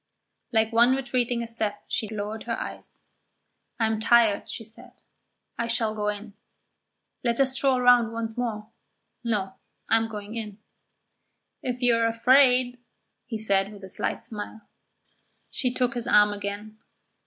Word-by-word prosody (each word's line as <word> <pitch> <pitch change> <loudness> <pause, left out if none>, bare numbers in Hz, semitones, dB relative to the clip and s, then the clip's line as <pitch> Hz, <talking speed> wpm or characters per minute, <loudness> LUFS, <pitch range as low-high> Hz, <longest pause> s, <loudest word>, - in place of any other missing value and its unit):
Like 220 -1 +2
one 240 +3 +5
retreating 245 -3 -1
a - - -6
step, 220 -3 -3
she 230 -4 -2
lowered 215 0 -5
her 230 -1 -2
eyes. - - -6 0.7
"I 225 - +3
am 220 -1 0
tired," 225 -2 +4
she 225 - -6
said. 220 - -15 0.7
"I 235 - 0
shall 230 -2 0
go 210 -1 -2
in." 210 0 -4 0.9
"Let 235 0 0
us 265 -1 +3
stroll 265 -1 +2
round 245 -2 +5
once 225 -1 -4
more." 220 -3 -3 0.5
"No, 200 -5 -1 0.3
I 225 - +6
am 225 0 0
going 210 -1 -7
in." 215 -3 -5 1.0
"If 250 0 -3
you 245 -1 +5
are 230 0 +3
afraid 250 +1 +4 0.2
" - - -52
he 230 -2 -3
said, 200 -2 +1
with 200 -2 -12
a 190 - -8
slight - - -3
smile. 215 0 -7 0.9
She 250 -3 -1
took 250 -1 0
his 240 0 -4
arm 210 0 +5
again. 205 +1 -6
225 Hz, 155 wpm, -26 LUFS, 210-245 Hz, 1.0 s, I